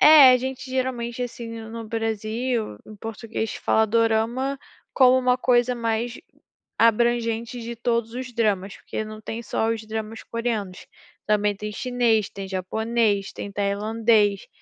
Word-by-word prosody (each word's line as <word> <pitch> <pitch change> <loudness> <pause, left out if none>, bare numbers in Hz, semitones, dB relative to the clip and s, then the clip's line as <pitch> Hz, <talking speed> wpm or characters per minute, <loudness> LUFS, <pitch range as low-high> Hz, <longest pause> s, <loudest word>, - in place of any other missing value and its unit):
É, 300 -4 +10
a - - +6
gente, 260 +1 -5
geralmente, 250 -2 -2
assim, 240 -1 -5
no 220 0 -9
no 230 0 -6
Brasil, 225 - -2
em 215 - -11
português, 225 +1 -4
fala 220 0 +2
"dorama" 230 +5 +1 0.4
como 260 -1 +6
uma 250 -1 +3
coisa 250 -1 +2
mais 230 0 -2 0.6
abrangente 235 +1 +2
de 235 +1 -5
todos 235 -1 0
os 250 0 -6
dramas, 205 -4 0
porque 220 - -5
não 215 0 -9
tem 225 +2 -5
só 225 0 -1
os 225 -1 -2
dramas 220 0 -5
coreanos, 225 -6 -3 0.4
também 210 -1 +2
tem 210 +1 -5
chinês, 235 -2 +1
tem 195 -1 -7
japonês, 205 +2 0
tem 200 - -7
tailandês, 205 +1 +1
225 Hz, 145 wpm, -24 LUFS, 215-240 Hz, 0.6 s, É